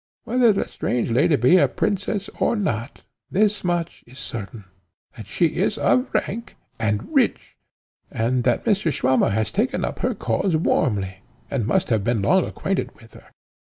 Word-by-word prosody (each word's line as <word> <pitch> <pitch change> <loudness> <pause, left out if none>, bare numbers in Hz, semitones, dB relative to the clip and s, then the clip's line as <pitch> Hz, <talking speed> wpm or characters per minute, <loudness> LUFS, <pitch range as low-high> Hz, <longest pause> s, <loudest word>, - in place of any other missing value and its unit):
Whether 245 -2 +3
the 200 - -1
strange 120 -1 -2
lady 140 +6 +3
be 130 +8 +5
a - - +5
princess 200 0 -2
or - - +2
not, 120 - -3 0.3
thus 210 +1 +1
much 175 -2 -2
is 125 +2 -15
certain, 110 -3 -7 0.5
that 110 -5 -10
she 170 - +1
is 200 +4 +1
of 255 +1 +2
rank 230 +4 -3 0.2
and 105 -2 -2
rich, - - +1 0.5
and 120 +2 0
that 120 -1 +1
Mr. 195 -6 +2
Swammer 130 -3 +2
has 110 0 -1
taken - - 0
up - - -5
her - - -1
cause 160 - 0
warmly, 100 - 0 0.3
and 120 -6 -1
must 190 +8 +1
have 110 -4 +1
been 115 -2 0
long 190 - +3
acquainted 195 0 -3
with 115 -1 -18
her. - - -16
130 Hz, 165 wpm, -22 LUFS, -, 0.5 s, be